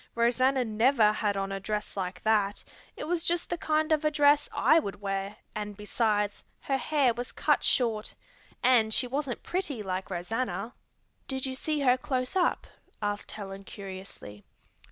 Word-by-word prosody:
"Rosanna 250 Hz, +2 st, +3 dB
never 225 Hz, 0 st, +4 dB
had 210 Hz, -1 st, 0 dB
on 195 Hz, 0 st, -2 dB
a 195 Hz, -, -3 dB
dress 210 Hz, +2 st, -3 dB
like 185 Hz, -2 st, -4 dB
that; 205 Hz, -2 st, +2 dB, 0.3 s
it -, -, -5 dB
was 335 Hz, +1 st, -1 dB
just 345 Hz, 0 st, 0 dB
the 345 Hz, -, 0 dB
kind 310 Hz, 0 st, +1 dB
of 310 Hz, -1 st, +3 dB
a 305 Hz, -, +4 dB
dress 290 Hz, -1 st, +4 dB
I 325 Hz, -, +5 dB
would 200 Hz, -11 st, -5 dB
wear 195 Hz, 0 st, -3 dB, 0.2 s
and, 210 Hz, -1 st, -5 dB
besides, 210 Hz, -1 st, 0 dB, 0.2 s
her 270 Hz, -1 st, 0 dB
hair 275 Hz, -3 st, +2 dB
was 245 Hz, +2 st, -5 dB
cut -, -, +2 dB
short. 225 Hz, -4 st, +1 dB, 0.5 s
And 240 Hz, -3 st, +5 dB
she 250 Hz, -, +2 dB
wasn't 270 Hz, 0 st, -3 dB
pretty 305 Hz, -, -2 dB
like 185 Hz, -1 st, -3 dB
Rosanna." 220 Hz, +5 st, -3 dB, 0.5 s
"Did 265 Hz, -1 st, -2 dB
you 265 Hz, -, -2 dB
see 300 Hz, +3 st, -1 dB
her 255 Hz, -2 st, +4 dB
close 255 Hz, +3 st, -2 dB
up?" 365 Hz, -2 st, +2 dB, 0.3 s
asked 205 Hz, -1 st, -3 dB
Helen 195 Hz, -2 st, -7 dB
curiously. 190 Hz, -, -9 dB
230 Hz, 165 wpm, -29 LUFS, 205-275 Hz, 0.5 s, I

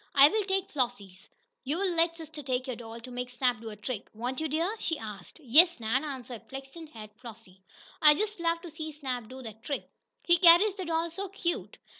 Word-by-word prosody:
"I'll 280 Hz, +1 st, +9 dB
take 385 Hz, 0 st, -1 dB
Flossie's. 235 Hz, -9 st, -3 dB, 0.3 s
You'll 350 Hz, +7 st, 0 dB
let 335 Hz, 0 st, +2 dB
sister 315 Hz, -2 st, -8 dB
take 255 Hz, -2 st, -1 dB
your 255 Hz, -3 st, -4 dB
doll 230 Hz, 0 st, -9 dB
to 250 Hz, +2 st, -10 dB
make 250 Hz, 0 st, -4 dB
Snap 245 Hz, -2 st, 0 dB
do 225 Hz, -, -6 dB
a 210 Hz, -, -8 dB
trick, 210 Hz, +1 st, -5 dB
won't 245 Hz, +4 st, -3 dB
you, 315 Hz, -, -1 dB
dear?" 335 Hz, +8 st, 0 dB
she 325 Hz, -, -1 dB
asked. 210 Hz, -, -9 dB
"Yes, 315 Hz, +6 st, +6 dB
Nan," 230 Hz, +5 st, 0 dB
answered 255 Hz, -5 st, -6 dB
flaxen 270 Hz, +5 st, -9 dB
haired 215 Hz, -7 st, -11 dB
Flossie. 225 Hz, -6 st, -12 dB, 0.4 s
"I 300 Hz, -1 st, +8 dB
just 425 Hz, +2 st, -2 dB
love 335 Hz, 0 st, +1 dB
to 345 Hz, -, -9 dB
see 315 Hz, 0 st, -6 dB
Snap 260 Hz, -6 st, -4 dB
do 260 Hz, 0 st, -9 dB
that 220 Hz, -1 st, -9 dB
trick! 280 Hz, +3 st, -4 dB, 0.4 s
He 345 Hz, 0 st, +5 dB
carries 350 Hz, +4 st, +7 dB
the 380 Hz, -2 st, -6 dB
doll 330 Hz, 0 st, -1 dB
so 390 Hz, +3 st, -5 dB
cute!" 345 Hz, -3 st, -3 dB
275 Hz, 205 wpm, -29 LUFS, 240-335 Hz, 0.4 s, I'll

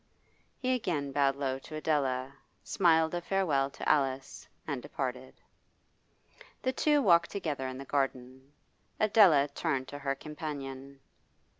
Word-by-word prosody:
He 255 Hz, -1 st, 0 dB
again 160 Hz, -, -2 dB
bowed 135 Hz, -1 st, +2 dB
low 135 Hz, -1 st, -2 dB
to 155 Hz, -, -10 dB
Adela, 135 Hz, -4 st, -1 dB, 0.3 s
smiled 160 Hz, -3 st, +3 dB
a 175 Hz, -, -1 dB
farewell 170 Hz, -8 st, +1 dB
to -, -, -7 dB
Alice, 135 Hz, -2 st, 0 dB, 0.2 s
and 140 Hz, -5 st, -3 dB
departed. 130 Hz, 0 st, -5 dB, 1.3 s
The 260 Hz, -, 0 dB
two 295 Hz, +1 st, +2 dB
walked 170 Hz, -4 st, +5 dB
together 150 Hz, -9 st, -3 dB
in 130 Hz, 0 st, -6 dB
the 135 Hz, -, -8 dB
garden. 130 Hz, -1 st, -3 dB, 0.5 s
Adela 200 Hz, -10 st, +5 dB
turned 135 Hz, -2 st, -2 dB
to 145 Hz, -, -7 dB
her 140 Hz, -1 st, -1 dB
companion. 140 Hz, -2 st, -7 dB
140 Hz, 130 wpm, -30 LUFS, 135-165 Hz, 1.3 s, walked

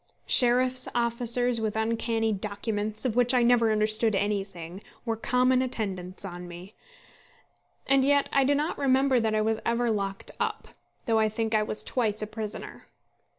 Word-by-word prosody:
Sheriff's 255 Hz, +1 st, +4 dB
officers 240 Hz, 0 st, +1 dB
with 220 Hz, -1 st, -2 dB
uncanny 225 Hz, 0 st, -1 dB
documents, 210 Hz, +2 st, -3 dB
of 235 Hz, -4 st, -1 dB
which 245 Hz, +1 st, +3 dB
I 245 Hz, -, +3 dB
never 235 Hz, -2 st, +3 dB
understood 215 Hz, 0 st, +4 dB
anything, 195 Hz, -3 st, -3 dB, 0.2 s
were 230 Hz, -1 st, -1 dB
common 250 Hz, +3 st, +1 dB
attendants 195 Hz, -7 st, -4 dB
on 175 Hz, -1 st, -8 dB
me. 175 Hz, +4 st, -11 dB, 1.1 s
And 275 Hz, 0 st, +3 dB
yet 285 Hz, +1 st, +2 dB
I 275 Hz, -, +4 dB
do 285 Hz, +2 st, +2 dB
not 300 Hz, +4 st, -2 dB
remember 265 Hz, -1 st, +2 dB
that 220 Hz, -1 st, 0 dB
I 215 Hz, -, +1 dB
was 220 Hz, 0 st, 0 dB
ever 235 Hz, 0 st, 0 dB
locked 195 Hz, -2 st, -3 dB
up, -, -, -3 dB, 0.4 s
though 225 Hz, -1 st, +2 dB
I 215 Hz, 0 st, +2 dB
think 220 Hz, +1 st, -3 dB
I 215 Hz, -, +3 dB
was 215 Hz, 0 st, -4 dB
twice 215 Hz, -4 st, -1 dB
a -, -, -2 dB
prisoner. 215 Hz, 0 st, -8 dB
225 Hz, 160 wpm, -26 LUFS, 210-245 Hz, 1.1 s, Sheriff's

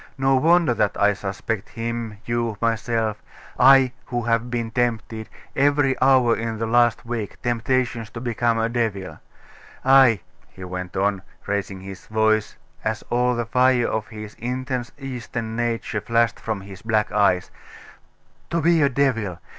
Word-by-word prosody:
No 135 Hz, 0 st, +3 dB
wonder 165 Hz, 0 st, +4 dB
that 105 Hz, -3 st, 0 dB
I 105 Hz, 0 st, +4 dB
suspect 100 Hz, +2 st, -4 dB
him, 115 Hz, -2 st, -4 dB
you, 115 Hz, -2 st, -1 dB
myself 115 Hz, -1 st, -1 dB, 0.4 s
I, 135 Hz, 0 st, +7 dB, 0.2 s
who 120 Hz, -1 st, -2 dB
have 115 Hz, +1 st, 0 dB
been 115 Hz, -2 st, -3 dB
tempted, 115 Hz, -2 st, -2 dB, 0.3 s
every 140 Hz, -1 st, +3 dB
hour 130 Hz, -3 st, +5 dB
in 115 Hz, 0 st, -3 dB
the 115 Hz, -, -2 dB
last 120 Hz, 0 st, +2 dB
week, 115 Hz, -4 st, -4 dB
temptations 120 Hz, -1 st, 0 dB
to 115 Hz, -, -8 dB
become 120 Hz, -1 st, 0 dB
a 115 Hz, 0 st, +1 dB
devil. 115 Hz, -5 st, -2 dB, 0.7 s
Ay,' 130 Hz, -7 st, +6 dB, 0.3 s
he 95 Hz, -, -12 dB
went 90 Hz, 0 st, -6 dB
on, 100 Hz, 0 st, +1 dB, 0.2 s
raising 100 Hz, -2 st, -3 dB
his 95 Hz, -1 st, -10 dB
voice, 110 Hz, 0 st, +1 dB, 0.3 s
as -, -, -2 dB
all 125 Hz, +1 st, +2 dB
the 120 Hz, 0 st, -2 dB
fire 125 Hz, +1 st, +3 dB
of 110 Hz, -1 st, -2 dB
his 105 Hz, -1 st, -9 dB
intense 125 Hz, +1 st, -3 dB
Eastern 120 Hz, -4 st, -5 dB
nature 115 Hz, -2 st, -2 dB
flashed 115 Hz, +1 st, +1 dB
from 110 Hz, -3 st, -3 dB
his 95 Hz, -1 st, -11 dB
black 110 Hz, -2 st, 0 dB
eyes, 100 Hz, -3 st, +2 dB, 1.0 s
'to 170 Hz, -, 0 dB
be 165 Hz, 0 st, +3 dB
a 140 Hz, -, +4 dB
devil! 120 Hz, -9 st, 0 dB
115 Hz, 150 wpm, -23 LUFS, 110-125 Hz, 1.0 s, I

